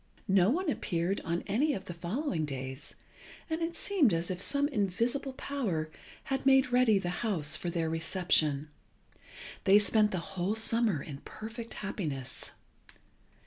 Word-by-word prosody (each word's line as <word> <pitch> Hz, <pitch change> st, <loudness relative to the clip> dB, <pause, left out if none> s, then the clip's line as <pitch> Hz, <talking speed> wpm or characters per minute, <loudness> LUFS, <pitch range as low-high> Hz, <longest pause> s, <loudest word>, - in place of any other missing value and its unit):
No 190 Hz, 0 st, +5 dB
one 355 Hz, +8 st, 0 dB
appeared 185 Hz, -, -1 dB
on 170 Hz, 0 st, -2 dB
any 275 Hz, +9 st, +1 dB
of 190 Hz, -, -6 dB
the 175 Hz, -, -6 dB
following 175 Hz, -, -2 dB
days, 130 Hz, -1 st, -6 dB, 0.6 s
and 320 Hz, +1 st, -1 dB
it 335 Hz, +1 st, -2 dB
seemed 325 Hz, -, +3 dB
as 165 Hz, +2 st, -1 dB
if 180 Hz, 0 st, -4 dB
some 280 Hz, +6 st, +2 dB
invisible 240 Hz, +4 st, 0 dB
power 200 Hz, -, -2 dB, 0.3 s
had 270 Hz, 0 st, -2 dB
made 265 Hz, -1 st, +5 dB
ready 245 Hz, -4 st, +5 dB
the 180 Hz, -2 st, -2 dB
house 160 Hz, -10 st, 0 dB
for 175 Hz, -, -2 dB
their 165 Hz, -1 st, -1 dB
reception. 160 Hz, -3 st, +1 dB, 1.0 s
They 195 Hz, +2 st, +7 dB
spent 210 Hz, +1 st, +4 dB
the 190 Hz, -, -2 dB, 0.2 s
whole 190 Hz, +3 st, 0 dB
summer 220 Hz, -7 st, +2 dB
in 140 Hz, -3 st, -8 dB
perfect 225 Hz, -, -8 dB
happiness. 145 Hz, -, -4 dB
195 Hz, 145 wpm, -31 LUFS, 165-250 Hz, 1.0 s, They